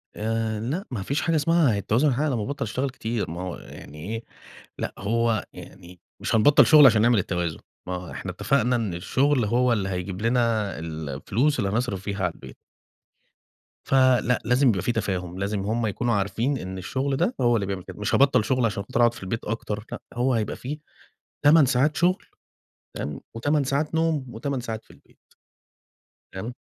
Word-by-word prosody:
آآ، 110 0 -1
لأ 145 - -3
ما 115 - -3
مفيش 140 +10 -1
حاجة 165 -2 +1
اسمها 155 -6 +3
التوازن 115 +9 +2
يتحقق 140 +3 +1
لمّا 120 -7 -1
أبطَّل 140 +4 -3
أشتغل 130 +5 -2
كتير، 115 -6 -3
ما 85 - -5
هو 90 -2 -4
يعني 75 +1 -11
إيه 115 +2 -4 0.5
لأ، - - -4
هو 115 +1 0
يعني 90 -1 -12 0.2
مش - - -1
هنبطَّل 140 +7 +6
شغل 155 -1 +8
علشان 110 -5 +6
نعمل 120 -1 +4
التوازن، 90 -3 -2 0.3
ما 90 - -3
هو 90 -1 -7
إحنا - - -5
اتفقنا 125 -2 +1
إن 110 -6 -1
الشغل 130 +8 +1
هو 120 +3 +2
اللي 100 -4 -1
هيجيب 90 +1 -4
لنا 115 -4 +1
الـفلوس 80 - -1
اللي 100 -3 0
هنصرف 105 -4 -2
بيها 100 -1 -3
على 85 - -1
البيت. - - -12 1.3
فلأ، 130 -2 +3
لازم 125 +3 +4
يبقى 95 -5 +1
فيه 95 - 0
تفاهم 95 -5 -3
لازم 100 +1 -1
هُم 110 +3 -1
يكونوا 120 +3 -1
عارفين 110 +7 0
إن 95 -4 -6
الشغل 130 +9 -2
ده 245 - 0
هو 120 -1 +4
اللي 100 -3 0
بيعمل 95 -2 -4
كده، - - -10
مش 105 - 0
هباطل 130 -4 +4
شغل 130 +2 +1
علشان 105 -3 0
خاطر 110 - -3
أقعد 120 -1 +5
في - - -10
البيت 110 +4 -4
أكتر، 105 -1 -4
لأ - - -5
هو 125 +2 +1
هيبقى 110 -3 -1
في 145 +4 -6 0.7
8 150 0 +7
ساعات 135 +4 +2
شغل 180 +2 +2 0.7
تمام، 75 -1 -4 0.2
و8 145 +5 +1
ساعات 140 +4 -1
نوم 160 -4 +1
و8 130 +4 -3
ساعات 110 -2 -6
في - - -18
البيت. - - -23 1.2
تمام. 110 +6 -5
115 Hz, 185 wpm, -25 LUFS, 100-130 Hz, 1.3 s, شغل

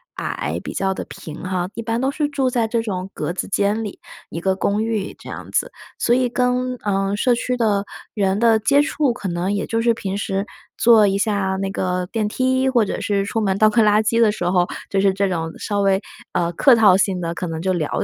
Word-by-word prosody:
矮， - - -3
比 - - -6
较 190 0 0
地 - - -6
平 155 -1 -9
哈， 185 -1 -2
一 230 - -5
般 230 0 -2
都 270 - +1
是 300 +1 -1
住 275 -3 0
在 235 -3 0
这 230 0 0
种 190 -4 -4
格 - - -3
子 180 - -4
间 205 +3 0
里， 210 +4 -7 0.3
一 165 - -5
个 190 +2 0
公 200 +2 0
寓 220 -3 -2
这 - - -12
样 - - -8
子， - - 0 0.3
所 240 - +2
以 255 -1 +1
跟， 250 +1 0
嗯， 195 0 0
社 250 +3 +3
区 250 +1 -2
的 205 -4 +1 0.3
人 195 -1 0
的 225 -1 +4
接 280 +6 +4
触， 295 -2 +1
可 205 - -6
能 175 +3 -1
也 200 - -1
就 225 0 -1
是 235 0 +3
平 200 -3 -4
时 195 -1 -2 0.3
坐 225 -3 +6
一 195 0 +1
下 200 -2 0
那 195 0 -2
个 180 -1 -2
电 220 -2 0
梯， 260 +3 +1
或 240 -4 +3
者 - - -4
是 200 -1 0
出 225 +2 -2
门 195 -2 0
倒 215 +1 +5
个 225 +2 +3
垃 210 0 +4
圾 230 +2 +1
的 225 -3 +5
时 180 -4 -4
候， 180 -1 +2 0.2
就 195 - 0
是 195 -1 +3
这 200 +1 +1
种 165 -2 -2
稍 205 -1 -2
微， 195 0 +2 0.3
呃， 170 0 0
客 255 - +5
套 210 -5 +6
性 195 -1 +1
地 170 -1 -2
可 180 - -4
能 160 -1 -4
就 185 +1 0
聊 155 -4 -1
205 Hz, 255 characters per minute, -21 LUFS, 190-230 Hz, 0.3 s, 坐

